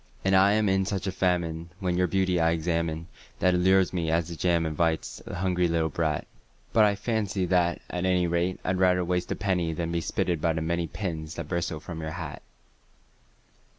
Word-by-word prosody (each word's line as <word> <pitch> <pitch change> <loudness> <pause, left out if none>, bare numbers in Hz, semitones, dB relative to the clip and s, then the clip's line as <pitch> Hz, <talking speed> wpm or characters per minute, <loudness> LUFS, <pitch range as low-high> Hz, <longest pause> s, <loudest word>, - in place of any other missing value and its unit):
And 95 0 +4
I 95 +2 +6
am 110 0 +2
in 95 0 +2
such 95 -1 -2
a 95 - -1
famine 85 -3 -1
when 90 -3 -1
your 90 0 +2
beauty 95 -1 +1
I 80 0 +3
examine 85 -1 -1 0.3
That 90 0 +3
it 90 - +2
lures 95 +1 +4
me 85 -3 -1
as 80 +1 +1
the 85 - -5
jam 85 0 +1
invites 80 +1 -1
a - - -5
hungry 90 0 +1
little 80 -1 +1
brat; 80 0 -1 0.5
But 110 -1 +6
I 100 -1 +2
fancy 105 -3 -1
that, 90 -1 +1
at 90 0 -3
any 90 -1 +2
rate, 85 +2 0
I'd 90 0 0
rather 90 -1 +3
waste 90 0 -1
a - - 0
penny 90 -4 0
Than 85 0 -3
be 85 0 0
spitted 85 -1 -1
by 85 -1 +2
the 80 - -2
many 85 +1 -1
pins 80 -3 -5
that 85 -3 -5
bristle 85 -3 -2
from 80 +1 -7
your 80 - -4
hat. 80 -5 -6
90 Hz, 210 wpm, -27 LUFS, 80-95 Hz, 0.5 s, I